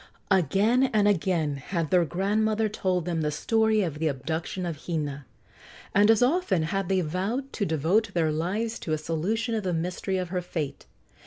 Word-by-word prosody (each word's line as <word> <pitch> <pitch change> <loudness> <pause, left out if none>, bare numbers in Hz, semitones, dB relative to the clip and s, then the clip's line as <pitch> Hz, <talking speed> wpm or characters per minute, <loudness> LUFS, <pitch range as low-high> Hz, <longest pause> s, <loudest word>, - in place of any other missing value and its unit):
Again 200 - +3
and 210 -1 +4
again 170 -7 +1
had 165 +3 -3
their 180 -2 +4
grandmother 215 +5 +1
told 185 -4 -1
them 170 -2 -1
the 150 - 0
story 220 +7 +2
of 155 -4 -4
the 160 - +1
abduction 160 +6 -3
of 165 -4 -6
Hina, 145 -5 -3 0.7
and 205 +1 +5
as 225 +1 +5
often 265 - +2
had 195 +3 -2
they 190 -1 +2
vowed 195 - -2
to 205 - -1
devote 165 +8 +1
their 160 -2 +2
lives 205 +9 -2
to 155 - -3
a - - +1
solution 190 +10 -2
of 220 - 0
the 185 -3 -2
mystery 180 +3 -2
of 180 -2 -3
her 180 0 -1
fate. 155 -5 -5
180 Hz, 180 wpm, -27 LUFS, 160-215 Hz, 0.7 s, and